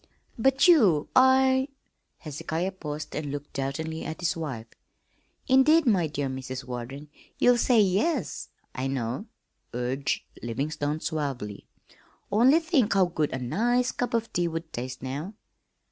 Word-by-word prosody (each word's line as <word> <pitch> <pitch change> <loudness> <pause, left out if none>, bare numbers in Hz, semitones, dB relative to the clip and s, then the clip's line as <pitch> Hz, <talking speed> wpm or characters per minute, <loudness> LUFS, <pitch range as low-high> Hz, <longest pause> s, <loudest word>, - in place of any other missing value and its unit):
"But 265 +7 +3
you 205 - +5
I 260 0 +5 0.3
" - - -50
Hezekiah 160 +5 -3
paused 150 -5 -6
and 145 -2 -3
looked 145 0 -7
doubtingly 155 +4 -3
at 160 0 -5
his 175 - 0
wife. 135 -9 -5 0.8
"Indeed, 295 +4 +5
my 190 -9 +3
dear 145 -2 -3
Mrs. 130 -1 -5
Warden, 125 +4 -7 0.3
you'll 245 -1 +4
say 240 -2 +4
'Yes,' 205 - +1 0.2
I 130 +1 -2
know," 130 - -3 0.5
urged 130 +3 -1 0.2
Livingstone 145 +5 -2
suavely. 135 -10 -4 0.6
"Only 245 +9 +5
think 295 - +1
how 190 -1 +5
good 160 -4 -1
a - - -2
nice 235 - +1
cup 245 -1 -2
of 230 0 -2
tea 175 0 +1
would 165 0 -5
taste 125 +1 -5
now." 145 +10 -5
160 Hz, 140 wpm, -27 LUFS, -, 0.8 s, you